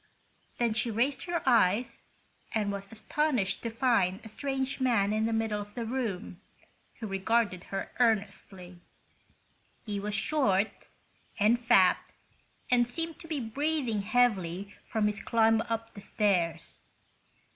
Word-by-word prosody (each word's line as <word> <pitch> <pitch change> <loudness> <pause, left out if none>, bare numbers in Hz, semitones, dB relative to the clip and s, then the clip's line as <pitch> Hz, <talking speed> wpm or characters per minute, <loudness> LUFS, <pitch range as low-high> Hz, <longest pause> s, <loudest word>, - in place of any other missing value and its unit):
Then 235 -2 +1
she 235 +2 -1
raised 240 +6 0
her 345 -1 -2
eyes 230 -1 +3 0.5
and 210 -2 +1
was 200 0 -6
astonished 225 0 0
to 230 - -3
find 225 -6 +1
a - - -8
strange 270 +3 -3
man 220 -5 +2
in 220 +1 +1
the - - -1
middle 225 -2 0
of 205 0 -11
the 235 -2 -3
room, 220 -7 -4 0.5
who 230 - -7
regarded 200 -1 0
her 195 0 -5
earnestly. 195 -5 -1 1.1
He 205 -2 -3
was 205 +1 -2
short 215 -4 +1 0.5
and 220 +4 +4
fat, 195 -6 +5 0.7
and 240 -1 +4
seemed 330 +5 -4
to 330 - -11
be 310 -3 -2
breathing 260 -2 -1
heavily 200 -4 +1
from 220 -2 0
his 210 -1 -1
climb 225 -1 +3
up 225 0 -3
the 200 - -10
stairs. 180 -6 0
220 Hz, 135 wpm, -29 LUFS, 200-245 Hz, 1.1 s, fat